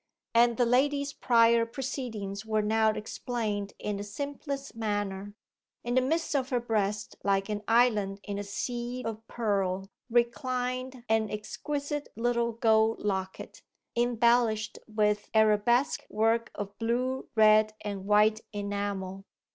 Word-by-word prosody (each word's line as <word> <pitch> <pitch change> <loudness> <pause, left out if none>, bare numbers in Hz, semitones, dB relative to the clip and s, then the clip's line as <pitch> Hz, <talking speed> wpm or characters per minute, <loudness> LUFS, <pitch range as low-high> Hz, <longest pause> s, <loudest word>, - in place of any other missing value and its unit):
And 235 0 +4
the 245 - +3
lady's 280 +4 +2
prior 230 -3 +4
proceedings 230 -5 -4
were 215 -1 0
now 220 +1 +3
explained 215 -2 -3
in 210 -1 -3
the 200 - -4
simplest 280 +5 -5
manner. 205 -2 -3 0.5
In 240 - -2
the 255 - +4
midst 320 +4 0
of 265 -2 0
her 250 -3 +1
breast, 210 -3 -1
like 195 0 +1
an 210 -1 -2
island 215 -4 +3
in 205 -1 -4
a - - -3
sea 240 +4 -4
of 225 -1 -4
pearl, 195 -4 -1 0.2
reclined 250 +1 -1
an 220 -1 +2
exquisite 285 +7 -4
little 235 +1 +1
gold 225 -1 +2
locket, 190 -2 -3 0.3
embellished 235 -2 +2
with 210 -1 0
arabesque 220 +5 +3
work 225 +2 +1
of 200 0 -5
blue, 250 +3 -1
red, 215 0 +5
and 200 -2 -5
white 210 +1 +4
enamel. 200 -2 -3
225 Hz, 130 wpm, -29 LUFS, 205-245 Hz, 0.5 s, red